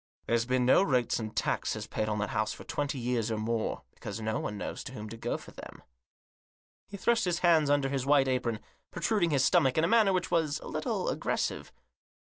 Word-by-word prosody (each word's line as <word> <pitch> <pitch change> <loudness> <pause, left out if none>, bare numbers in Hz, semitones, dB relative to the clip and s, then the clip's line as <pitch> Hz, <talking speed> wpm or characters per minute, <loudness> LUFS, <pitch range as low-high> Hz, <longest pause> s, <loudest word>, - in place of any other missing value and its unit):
There's 115 0 +1
been 125 -1 +2
no 130 - +6
rates 125 -12 +1
and 110 -1 -6
taxes - - -1
paid 110 0 -2
on 105 - -1
that 100 -1 -2
house 110 0 0
for - - -10
twenty 145 -1 -3
years 120 -2 -1
or 110 - -1
more; 110 +1 -2
because 100 +2 -7
no 110 0 -2
one 105 - -4
knows - - -5
to 130 - -7
whom 110 -3 -7
to 115 - -7
go 115 +1 -3
for - - -13
them." - - -11 1.0
He 200 - -8
thrust 230 +2 +2
his 175 -1 -1
hands 160 -4 +5
under 145 -1 +3
his 135 -2 -1
white 140 0 +4
apron, 125 -4 -1 0.3
pro 170 - -8
truding 200 -5 +2
his 140 -4 +2
stomach 130 +1 +3
in 155 - +3
a - - +3
manner 220 -3 +4
which 185 -2 -1
was 155 -3 +1
a - - -9
little - - -2
aggressive. - - -2
130 Hz, 220 wpm, -30 LUFS, 115-160 Hz, 1.0 s, no